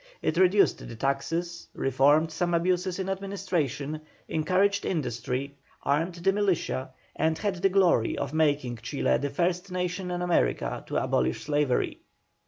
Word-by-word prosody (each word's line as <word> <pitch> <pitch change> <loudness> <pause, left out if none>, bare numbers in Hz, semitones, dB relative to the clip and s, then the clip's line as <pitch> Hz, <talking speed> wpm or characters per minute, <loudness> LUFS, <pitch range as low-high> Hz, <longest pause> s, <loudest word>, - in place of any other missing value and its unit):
It 155 - +1
reduced 190 +3 +4
the 115 - -8
taxes, 145 +7 -2
reformed 145 +5 +3
some 175 +1 0
abuses 180 +1 0
in 190 -1 -3
administration, 185 -7 -2 0.3
encouraged 185 +6 +1
industry, 130 -2 -2 0.3
armed 160 +5 0
the 185 +3 +1
militia, 190 -9 0 0.3
and 160 +1 +1
had 200 0 -1
the 195 +3 +2
glory 180 - +3
of 140 - -3
making 145 -6 +1
Chile 115 +6 0
the 145 - -2
first 180 +5 -1
nation 180 0 -2
in 175 0 -2
America 175 -1 0
to - - -5
abolish 65 +1 0
slavery. 145 -3 0
170 Hz, 140 wpm, -27 LUFS, 140-185 Hz, 0.3 s, reduced